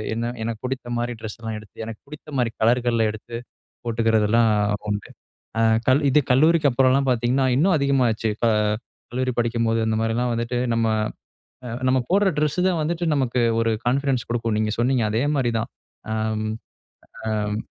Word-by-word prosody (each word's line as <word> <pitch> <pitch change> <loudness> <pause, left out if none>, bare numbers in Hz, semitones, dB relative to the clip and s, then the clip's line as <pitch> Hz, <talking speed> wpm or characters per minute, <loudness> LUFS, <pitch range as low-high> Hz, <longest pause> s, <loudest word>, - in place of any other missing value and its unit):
என்ன 115 +1 -2 0.2
எனக்கு 115 -1 -3
பிடித்த 130 -1 -4
மாதிரி 120 +1 -2
ட்ரெஸ்லாம் 110 0 -5
எடுத்து, 110 -1 -17
எனக்கு 110 -1 -8
பிடித்த 150 +1 -11
மாதிரி 120 -2 +1
கலர்கள்ல 115 0 +3
எடுத்து 110 +2 -8 0.5
போட்டுக்கிறதெல்லாம் 115 -1 +2 0.4
உண்டு. 105 -1 -3 0.5
ஆ - - +3 0.5
இது 150 +3 +5
கல்லூரிக்கு 155 +3 +4
அப்புறம்லாம் 135 +2 +3
பார்த்தீங்கன்னா, 125 +2 +1
இன்னும் 180 +7 +3
அதிகமாச்சு. 125 -6 +1
ப - - +4 0.6
கல்லூரி 130 +1 -1
படிக்கும்போது 115 -1 +1
அந்த 110 0 +1
மாரிலாம் 115 +2 0
வந்துட்டு 115 +1 -2 0.2
நம்ம 115 0 +1 1.0
நம்ம 130 0 +3
போடுற 195 +2 +4
டிரெஸ் 150 +1 0
தான் 180 -3 +1
வந்துட்டு 170 +3 -2
நமக்கு 130 -3 +1 0.2
ஒரு 115 0 +2
கான்ஃபிடன்ஸ் 130 -2 +1
கொடுக்கும். 115 -2 -1
நீங்க 110 0 0
சொன்னீங்க. 125 +1 +2
அதே 110 +2 +1
மாரிதான், 120 -5 0 0.4
ஆம் 110 0 -1 0.8
அம் 105 -1 -1
120 Hz, 140 wpm, -23 LUFS, 115-130 Hz, 1.0 s, இது